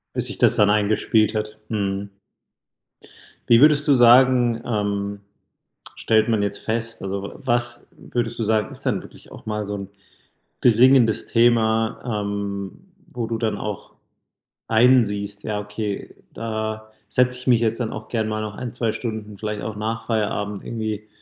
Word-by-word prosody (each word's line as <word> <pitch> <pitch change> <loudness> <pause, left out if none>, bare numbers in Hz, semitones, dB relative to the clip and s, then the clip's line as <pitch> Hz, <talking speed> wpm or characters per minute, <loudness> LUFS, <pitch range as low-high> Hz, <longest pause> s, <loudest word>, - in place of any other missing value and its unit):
Bis - - 0
sich - - -5
das - - +4
dann 105 - +4
eingespielt 110 +1 +2
hat. 110 0 -4
Mhm. 100 -2 -2 1.4
Wie 115 0 +7
würdest 150 +1 +5
du 145 - +6
sagen, 120 -1 +5
ähm, 100 -2 -2 0.8
stellt 110 0 +2
man 110 -3 +1
jetzt 100 0 -2
fest 115 +1 -4
also 95 0 -3
w 100 - -6
was 120 -2 -2
würdest 120 -2 -4
du 115 - -1
sagen, 110 -1 +1
ist - - -9
dann - - 0
wirklich - - -15
auch - - -13
mal 105 -1 -3
so 105 - -4
'n 100 -1 -6 0.7
dringendes 120 -1 +4
Thema, 115 -1 +1
ähm, 100 -1 -4 0.4
wo 120 -2 -2
du 115 0 -3
dann 110 -3 -1
auch 105 -2 -6 0.8
einsiehst: 105 -4 +2
„Ja 105 -1 -2
okay, 105 0 -5 0.2
da 110 -1 -4 0.2
setze 125 0 +1
ich 125 - -11
mich 120 -2 +4
jetzt 115 +1 0
dann 115 -3 -2
auch 110 0 -8
gern 110 -2 -1
mal 110 0 -2
noch 105 -2 -5
1, 125 -2 -6
2 115 -2 -1
Stunden 110 -3 -6
vielleicht 105 0 -4
auch 110 - -5
nach 110 +1 -4
Feierabend 105 -2 -2
irgendwie 110 -2 -4
110 Hz, 160 wpm, -22 LUFS, 105-115 Hz, 1.4 s, Wie